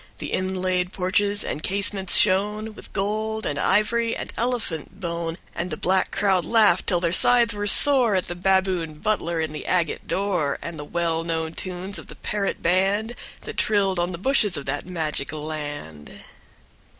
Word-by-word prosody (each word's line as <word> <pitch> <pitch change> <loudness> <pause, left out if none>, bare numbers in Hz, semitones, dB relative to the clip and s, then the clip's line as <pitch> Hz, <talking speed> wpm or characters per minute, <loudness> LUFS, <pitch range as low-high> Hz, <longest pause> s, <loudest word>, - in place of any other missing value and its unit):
The - - -6
inlaid 185 -1 -1
porches 200 +2 +1
and 150 - -4
casements 195 0 +1
shone 210 +3 +2
With - - -12
gold 215 +2 -2
and 145 0 -2
ivory 230 +5 +2
and - - -6
elephant 215 -7 -3
bone. 170 -2 -3 0.2
And 175 +1 -3
the 155 - -4
black 190 +1 +1
crowd 190 -3 +1
laughed 210 -5 +3
till 175 - +2
their 170 -1 0
sides 235 +3 +5
were 205 0 -3
sore 250 -1 +5
At 185 - 0
the - - -4
baboon 185 -3 0
butler 170 -1 -1
in 160 -1 -2
the 150 - -7
agate 175 -3 0
door, 185 -8 0
And 170 -2 -7
the - - -5
well 165 0 -1
known 160 -1 -2
tunes 185 +3 -5
of - - -12
the - - -10
parrot 205 -2 -3
band 195 +6 +1 0.3
That - - -8
trilled 195 -3 +2
on 175 +1 0
the 170 - -5
bushes 210 -3 +2
of 145 - -6
that 145 +4 -3
magic 160 -5 -2
land. 145 - -6
185 Hz, 175 wpm, -24 LUFS, 165-205 Hz, 0.3 s, sides